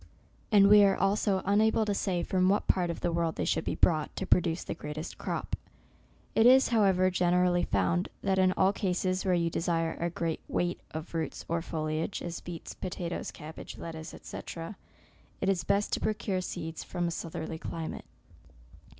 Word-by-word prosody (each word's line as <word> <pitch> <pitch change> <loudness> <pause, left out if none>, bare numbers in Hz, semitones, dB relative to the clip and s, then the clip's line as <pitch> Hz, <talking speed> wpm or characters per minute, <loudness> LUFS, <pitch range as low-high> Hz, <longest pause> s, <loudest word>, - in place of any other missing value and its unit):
And 200 -1 +7
we 205 0 +8
are 195 -1 +4
also 195 -1 +1
unable 220 +2 +3
to 205 - 0
say 185 -3 -1
from 185 0 +2
what 205 - +2
part 180 -2 +2
of 170 - -4
the 175 - 0
world 165 -1 0
they - - -1
should 160 - +1
be - - -2
brought, 155 -3 +2
to 190 - -3
produce 175 -2 +2
the - - -4
greatest 150 +2 -7
crop. - - -3 0.8
It 225 - +5
is, 260 +1 +7
however, 190 -5 +3
generally 180 0 +2
found, 175 +2 +1
that 190 -1 +2
in 185 0 +5
all 190 +2 +3
cases 185 -1 0
where 185 -1 +3
you 170 -1 +1
desire 165 -1 0
a 170 - 0
great 165 -1 -2
weight 175 0 -1
of 160 +2 -7
roots 160 -3 -3
or 170 0 0
foliage, 155 +2 -3
as 170 -1 -4
beets, 170 -2 -8
potatoes, 175 -2 -4
cabbage, 155 +1 -9
lettuce, 160 -1 -7
&c. - - -8 1.0
it 195 - 0
is 180 -5 +1
best 200 +4 +1
to - - +1
procure 200 -3 -1
seed 165 -3 -5
from 175 -1 -2
a - - -2
southerly 160 -1 -5
climate. 160 -1 -5
175 Hz, 180 wpm, -30 LUFS, 165-195 Hz, 1.0 s, we